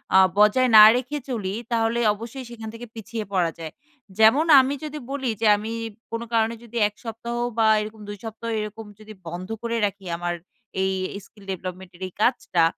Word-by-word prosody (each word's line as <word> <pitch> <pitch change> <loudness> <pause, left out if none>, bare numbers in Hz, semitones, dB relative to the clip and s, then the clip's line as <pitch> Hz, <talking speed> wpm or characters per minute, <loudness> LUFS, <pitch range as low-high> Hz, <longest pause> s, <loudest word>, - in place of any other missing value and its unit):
আ - - +9 0.2
বজায় 215 +5 +5
না 210 - +12
রেখে 255 +4 -2
চলি 205 -7 -2 0.2
তাহলে 230 0 +1
অবশ্যই 230 +5 -8
সেখান 225 -2 -8
থেকে 235 +1 -9
পিছিয়ে 225 0 -5
পড়া 175 -3 +2
যায়। 160 -1 -6 0.5
যেমন 225 +9 +6
আমি 265 +1 +2
যদি 305 0 -5
বলি 270 -3 -2
যে 225 - +3
আমি 215 +2 -5 0.4
কোনো 230 0 -3
কারণে 225 0 +2
যদি 235 0 -8
১ 210 - -11
সপ্তাহ 235 +1 -5 0.2
বা 225 -1 +4
এরকম 215 0 -8
২ 205 - -6
সপ্তাহ 225 +1 -6
এরকম 215 +1 -6
যদি 215 0 -11
বন্ধ 175 +2 -6
করে 235 0 -2
রাখি 200 -1 -5
আমার 175 0 -2 0.5
এই 190 - +1 0.3
স্কিল 205 0 -19
ডেভেলপমেন্টের 185 0 -7
এই 185 - -13
কাজটা, 215 -8 +2
220 Hz, 180 wpm, -24 LUFS, 200-235 Hz, 0.5 s, না